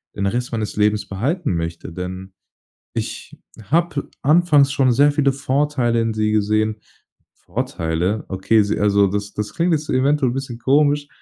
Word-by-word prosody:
den 100 - -2
Rest 120 +4 -2
meines 110 -2 -3
Lebens 105 0 +1
behalten 130 - -1
möchte, 85 +1 -4
denn 95 +2 -7 0.6
ich - - -5 0.3
habe 160 - 0
anfangs 150 -2 +4
schon 130 -3 +3
sehr 145 +4 +4
viele 140 -2 +2
Vorteile 135 -3 0
in 115 -1 -1
sie 110 0 0
gesehen. 110 +1 +1 0.6
Vorteile? 85 +6 -2
Okay, 95 +3 +2
sie 100 - -1
also 100 -1 +3
das 100 +1 -3
das 105 -1 -4
klingt 170 +1 +1
jetzt 150 -1 -1
eventuell 135 0 +2
'n - - -5
bisschen 130 -3 -5
komisch, 145 +3 +2
115 Hz, 155 wpm, -20 LUFS, 100-140 Hz, 0.6 s, anfangs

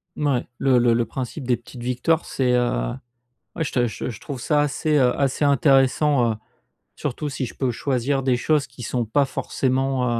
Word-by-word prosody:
Mouais, 140 -5 0
le 130 -2 +3
le 120 -1 +4
le 120 0 +1
principe 130 +3 -6
des 125 -2 +2
petites 120 +1 -12
victoires, 125 +7 0
c'est, 130 -2 0
heu, 90 - +1 0.6
ouais, 165 - -1
je 150 - -4
te 120 -2 +2
je 120 - -5
je 110 - -10
trouve 140 -3 -6
ça 145 +4 +2
assez, 150 +2 0
heu, 125 -3 +3
assez 140 +1 +1
intéressant, 135 -2 +3
heu, - - -7 0.6
surtout 150 +1 -3
si 135 -1 -3
je - - -10
peux 130 -2 -1
choisir 135 +2 -1
des 130 -1 +2
choses 145 +3 +1
qui 125 0 -12
sont 120 0 -2
pas 140 +6 +2
forcément, 130 -1 -1
130 Hz, 195 wpm, -23 LUFS, 120-140 Hz, 0.6 s, le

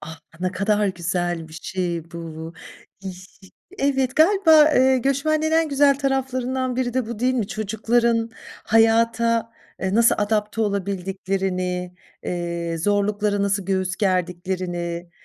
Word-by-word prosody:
Ah, 160 +1 -10 0.2
ne 185 0 -1
kadar 205 +2 +1
güzel 175 -2 -2
bir - - -15
şey 170 -3 -3
bu. 165 -1 -7 0.5
Yi 190 -1 -5
ş 185 +1 -13 0.5
Evet, 270 -2 0
galiba, 320 -3 +6
eee, 260 0 +4
göçmenliğin 310 +4 0
en 325 0 +3
güzel 280 -1 +3
taraflarından 260 -2 -1
biri 245 -2 -1
de 255 -3 0
bu, 235 -2 -6
değil 255 +2 +1
mi? 230 -5 0
Çocukların 230 +2 0 0.3
hayata, 230 +1 +2 0.3
e, 190 0 -2
nasıl 230 +1 +5
adapte 210 +1 0
olabildiklerini, 190 -2 -2 0.3
eee, 170 -1 -3
zorluklara 205 +2 0
nasıl 200 -1 -1
göğüs 190 -2 -1
gerdiklerini, 180 -2 -2
205 Hz, 125 wpm, -22 LUFS, 180-250 Hz, 0.5 s, galiba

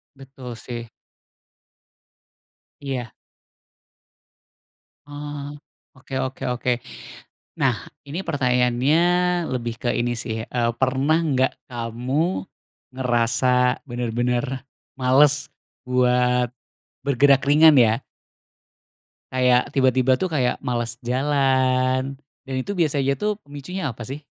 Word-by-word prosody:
Betul 135 -3 -10
sih. 120 -1 -7 1.9
Iya. 130 -5 -4 2.0
Oh. 145 0 -7 0.4
Oke 130 +1 -13
oke 130 0 -5
oke. 125 +1 -1 0.9
Nah - - +3 0.3
ini 165 +7 -4
pertanyaannya 125 +1 +2 0.5
lebih 120 -2 -3
ke 120 - 0
ini 120 0 0
sih, 110 -1 -4
eee, 120 -1 0
pernah 135 +5 +2
enggak 135 -5 +1 0.2
kamu 125 +10 -2 0.5
ngerasa 125 0 +2
benar-benar 120 +2 -1 0.3
males 140 +3 +3 0.3
buat 125 -1 +2 0.6
bergerak 140 0 +4
ringan 155 0 +7
ya? 115 +2 +3 1.3
Kayak 125 -1 +4
tiba-tiba 130 -1 +3
tuh 185 - 0
kayak 140 -7 0
males 120 -1 -2
jalan, 130 0 +1 0.2
dan 135 -1 -5
itu 200 +10 -4
biasanya 140 -5 +1
tuh 210 0 -2
pemicunya 145 +2 -6
apa 120 -1 -6
sih? 135 +6 -7
130 Hz, 95 wpm, -23 LUFS, 125-140 Hz, 2.0 s, ringan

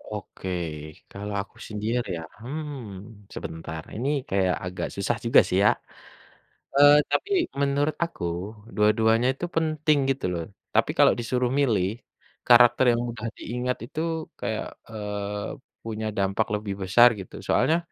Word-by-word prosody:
Oke. 95 -2 -7 0.6
Kalau 105 +1 -6
aku 100 - -13
sendiri 110 +3 -2
ya, 80 - -6 0.2
hmm, 115 -8 -7
sebentar, 80 -1 -6
ini 125 +6 -1 0.2
kayak 95 -2 +2
agak 90 +1 -3
susah 100 +4 0
juga 115 - +7
sih, 90 - 0
ya. - - +8 1.1
Eee, 145 +1 +8
tapi 405 - 0 0.3
menurut 145 +2 +1
aku, 170 - -4 0.5
dua-duanya 110 +3 +3
itu 175 - -4
penting, 155 -1 +2
gitu 135 0 -1
loh. 85 -1 -2 0.3
Tapi - - +3
kalau - - +7
disuruh 125 +1 0
milih, 105 -10 +2 0.6
karakter 120 +1 +7
yang 115 - 0
mudah 115 -1 -5
diingat 125 +2 -2
itu 155 - -4 0.4
kayak, - - -2 0.2
eee, 105 -1 -4 0.3
punya 110 -1 -4
dampak 100 +2 +1
lebih 105 -1 -3
besar, 120 +6 +7
gitu. 95 - -9
Soalnya 160 - +3
115 Hz, 135 wpm, -26 LUFS, 100-130 Hz, 1.1 s, ya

